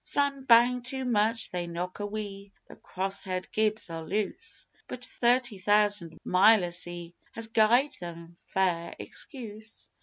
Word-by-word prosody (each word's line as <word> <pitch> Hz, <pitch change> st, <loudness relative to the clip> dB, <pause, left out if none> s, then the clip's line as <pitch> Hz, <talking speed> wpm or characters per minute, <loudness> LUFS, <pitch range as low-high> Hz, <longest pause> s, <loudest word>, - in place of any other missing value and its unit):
Slam 280 Hz, -2 st, 0 dB
bang 245 Hz, +1 st, +5 dB
too 260 Hz, +2 st, -2 dB
much 225 Hz, -1 st, +1 dB
they 175 Hz, -1 st, -3 dB
knock 175 Hz, +3 st, -5 dB
a 205 Hz, -, -2 dB
wee 200 Hz, -1 st, -6 dB
the -, -, -13 dB
crosshead 185 Hz, -1 st, -2 dB
gibs 215 Hz, -3 st, 0 dB
are 165 Hz, 0 st, -5 dB
loose; 210 Hz, -, -3 dB, 0.2 s
But 245 Hz, 0 st, -3 dB
thirty 240 Hz, -4 st, +1 dB
thousand 205 Hz, -4 st, +2 dB
mile 195 Hz, +1 st, +5 dB
o' 175 Hz, -, -5 dB
sea 175 Hz, 0 st, -5 dB, 0.2 s
has 225 Hz, -1 st, -4 dB
gied 235 Hz, +6 st, +4 dB
them 170 Hz, -1 st, -9 dB
fair 180 Hz, -3 st, 0 dB
excuse.... 220 Hz, -5 st, -7 dB
205 Hz, 145 wpm, -28 LUFS, 180-230 Hz, 0.2 s, bang